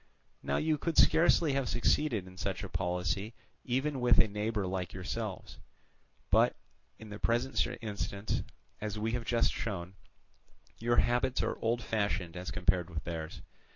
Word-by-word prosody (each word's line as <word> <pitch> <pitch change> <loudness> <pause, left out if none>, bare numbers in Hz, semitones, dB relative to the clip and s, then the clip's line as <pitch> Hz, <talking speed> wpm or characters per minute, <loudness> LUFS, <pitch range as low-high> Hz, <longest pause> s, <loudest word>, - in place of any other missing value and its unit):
Now - - 0
you 155 -1 +1
could 165 -2 -2
scarcely 165 -2 +5
have 135 -2 0
succeeded 120 -3 +1
in 95 0 -12
such 95 +1 -3
a 95 - -5
policy 90 +4 -1 0.3
even 135 +2 -1
with 120 -1 +5
a - - +6
neighbour 105 0 -1
like 90 -1 -3
yourselves; 90 -1 -5 0.7
but - - +5 0.4
in 110 - -11
the 105 0 -7
present 120 +3 +1 0.2
instance, 100 -1 -2 0.4
as 105 0 -4
we 110 +2 -1
have 120 -1 -2
just 115 -1 +2
shown, 95 -4 -4 0.9
your 120 +1 +2
habits 125 +2 +2
are - - -1
old 115 +1 0
fashioned 100 -6 -1
as 90 +1 -5
compared 90 -3 +1
with 80 -2 -5
theirs. 80 -2 -5
105 Hz, 155 wpm, -32 LUFS, 95-120 Hz, 0.9 s, a